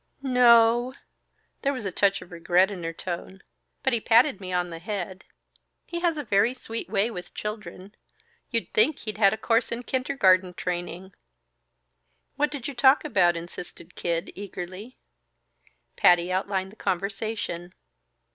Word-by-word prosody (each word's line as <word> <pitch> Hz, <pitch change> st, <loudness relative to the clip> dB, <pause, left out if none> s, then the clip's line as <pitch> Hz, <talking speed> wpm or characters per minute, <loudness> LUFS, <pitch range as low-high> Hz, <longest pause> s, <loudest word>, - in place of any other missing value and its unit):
"N 260 Hz, -, -1 dB
no." 240 Hz, 0 st, +5 dB, 0.7 s
There 280 Hz, 0 st, +1 dB
was 250 Hz, -6 st, -6 dB
a 195 Hz, -, -2 dB
touch 200 Hz, +1 st, +1 dB
of 175 Hz, -, -19 dB
regret 175 Hz, +3 st, +2 dB
in 180 Hz, -4 st, -6 dB
her 165 Hz, -, -2 dB
tone. 185 Hz, +3 st, -6 dB, 0.4 s
"But 265 Hz, -, +1 dB
he 235 Hz, -, +2 dB
patted 230 Hz, -1 st, +4 dB
me 185 Hz, -1 st, -6 dB
on 180 Hz, -1 st, -1 dB
the 165 Hz, -, -7 dB
head. 190 Hz, 0 st, -5 dB, 0.6 s
He 340 Hz, -, -4 dB
has 340 Hz, -2 st, +1 dB
a 295 Hz, -, -3 dB
very 215 Hz, +2 st, +2 dB
sweet 230 Hz, -2 st, -6 dB
way 205 Hz, +4 st, +1 dB
with 180 Hz, -4 st, -9 dB
children. 205 Hz, -2 st, -7 dB, 0.6 s
You'd 230 Hz, -2 st, -2 dB
think 270 Hz, +8 st, +3 dB
he'd 215 Hz, -1 st, -6 dB
had 200 Hz, -3 st, +6 dB
a 220 Hz, -, -2 dB
course 230 Hz, +1 st, +1 dB
in 235 Hz, +1 st, -4 dB
kindergarten 190 Hz, -9 st, +2 dB
training." 180 Hz, +1 st, -4 dB, 1.2 s
"What 295 Hz, +1 st, +1 dB
did 280 Hz, -5 st, -6 dB
you 285 Hz, -, -5 dB
talk 265 Hz, +4 st, +4 dB
about?" 180 Hz, -, +3 dB
insisted 175 Hz, 0 st, -9 dB
Kid, 170 Hz, +1 st, -2 dB
eagerly. 195 Hz, +4 st, -8 dB, 1.0 s
Patty 175 Hz, 0 st, +4 dB
outlined 190 Hz, 0 st, -1 dB
the -, -, -16 dB
conversation. 195 Hz, -2 st, -3 dB
200 Hz, 155 wpm, -26 LUFS, 180-235 Hz, 1.2 s, had